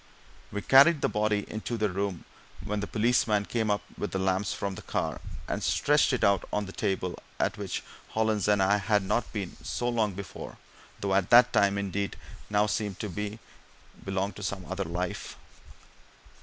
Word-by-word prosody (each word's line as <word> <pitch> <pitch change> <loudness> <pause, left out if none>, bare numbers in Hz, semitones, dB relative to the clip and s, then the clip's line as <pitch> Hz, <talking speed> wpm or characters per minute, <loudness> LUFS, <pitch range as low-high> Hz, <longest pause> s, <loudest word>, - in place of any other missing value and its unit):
We 105 0 -4
carried 140 +4 +7
the - - +2
body 105 -1 +1
into 110 +2 -4
the 105 -1 +2
room 95 -2 -3 0.4
when 105 0 -1
the 105 - -3
policeman 110 -2 +2
came 110 -1 -1
up 105 0 +1 0.2
with 105 - -2
the - - -2
lamps 95 +1 0
from 100 -1 -3
the - - -8
car, - - -2 0.3
and - - -2
stretched 145 0 +3
it 125 - 0
out 100 -1 +4
on 105 0 0
the 95 - -8
table 95 -2 -2 0.2
at - - +1
which - - -3 0.3
Hollins 110 -2 +1
and 105 -2 +4
I 100 +2 +4
had 105 0 +2
sat - - -7
not 120 - +1 0.4
so 120 - -2
long 110 -4 +1
before; 95 0 -8 0.4
though 100 -1 +3
that 120 +6 +6
time, 100 0 +3
indeed, 100 0 -2 0.3
now 105 0 +3
seemed 105 -2 -2
to 105 - -3
me 105 +3 -3
to 110 +2 -11 0.7
belong 95 +1 -1
to 100 - -10
some 95 -2 -3
other 95 +1 -3
life! 90 +2 -4
105 Hz, 185 wpm, -28 LUFS, 95-110 Hz, 0.7 s, carried